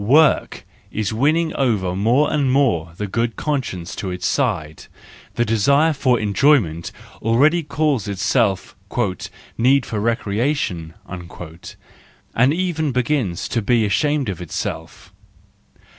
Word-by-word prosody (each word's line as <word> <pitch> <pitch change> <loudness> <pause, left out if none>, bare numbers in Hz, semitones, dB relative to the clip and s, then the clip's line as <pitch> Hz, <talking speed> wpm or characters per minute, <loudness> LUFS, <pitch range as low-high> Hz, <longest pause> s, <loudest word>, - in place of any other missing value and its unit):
Work 150 +8 +3 0.2
is 110 0 -2
winning 155 +7 +1
over 105 -9 0
more 120 +9 +2
and 140 -4 +1
more 110 - +1
the 105 - -3
good 115 +3 -1
conscience 120 - -3
to 95 - -3
its 90 +1 -4
side: 95 - -1 0.5
the 120 - +1
desire 140 +9 +3
for 130 -4 +2
enjoyment 105 - +2 0.3
already 145 +10 +3
calls 150 -6 -1
itself 100 0 0 0.4
" - - -13
need 130 +2 +4
of - - -10
recreation," 105 - -1
and 90 - -5
even 160 -3 -1
begins 125 - -1
to 115 - 0
be 115 +1 +2
ashamed 145 +6 +1
of 95 -4 -4
itself. 85 - -6
115 Hz, 120 wpm, -20 LUFS, 95-140 Hz, 0.5 s, need